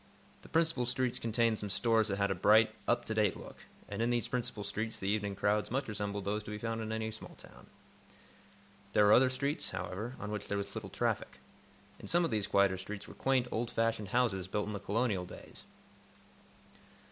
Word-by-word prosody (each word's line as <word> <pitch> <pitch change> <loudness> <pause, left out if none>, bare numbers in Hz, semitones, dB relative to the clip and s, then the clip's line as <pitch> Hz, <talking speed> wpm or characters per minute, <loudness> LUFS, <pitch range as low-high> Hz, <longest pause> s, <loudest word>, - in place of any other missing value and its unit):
The - - -14
principal 160 -6 +1
streets 125 0 +1
contained 115 -1 +1
some 105 - -4
stores 110 +1 +3
that 100 -2 -1
had 100 -1 +1
a - - +3
bright, 110 +4 +5
up 120 0 +2
to 110 - -2
date 105 -3 +2
look, - - -12 0.2
and 100 +2 -4
in 115 - +2
these 120 -3 +1
principal 125 -4 -3
streets 110 +3 -3
the 95 - -4
evening 100 -1 0
crowds 105 +2 +1
much 135 +3 -1
resembled 100 -2 -3
those 105 +2 -1
to - - -7
be 105 - -4
found 115 +1 -3
in 110 0 -4
any 110 0 -2
small 110 - -10
town. - - -15 1.3
There 105 - +5
were 105 - +7
other 130 +1 +6
streets, 140 +3 -1
however, 95 +7 -4
on 105 +1 -5
which 105 -1 -4
there 100 - -1
was 100 0 -4
little - - -6
traffic. - - -1 0.6
In - - -9
some 175 0 +4
of - - -2
these 105 -2 0
quieter 100 -1 +3
streets 100 +2 -6
were - - -10
quaint, 130 -2 +1
old 115 +1 -1
fashioned 115 -2 0
houses 100 -4 +1
built 105 +2 -1
in 105 - -4
the 100 - -3
Colonial 100 -2 0
days. - - -11
110 Hz, 205 wpm, -33 LUFS, 100-120 Hz, 1.3 s, were